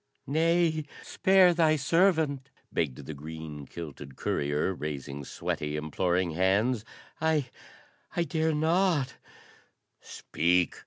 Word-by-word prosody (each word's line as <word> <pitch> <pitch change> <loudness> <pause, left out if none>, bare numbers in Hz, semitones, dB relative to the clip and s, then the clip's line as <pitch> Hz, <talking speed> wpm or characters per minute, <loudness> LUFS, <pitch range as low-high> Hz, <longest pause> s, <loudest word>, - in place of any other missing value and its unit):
"Nay, 160 +1 +2 0.2
spare 190 -2 +4
thy 160 -2 +4
servant!" 155 -2 +2 0.2
begged 70 -3 -2
the 80 - -6
green 75 -1 -8
kilted 75 -4 -8
courier, 75 +8 -1
raising 70 -3 -5
sweaty, 75 -1 -3
imploring 85 +4 0
hands. 100 +7 +2 0.4
"I 155 -5 +1 0.6
I 170 - +2
dare 160 -2 0
not 160 -3 +1 0.4
" - - -41
"Speak!" 90 +2 0
100 Hz, 105 wpm, -29 LUFS, -, 0.6 s, spare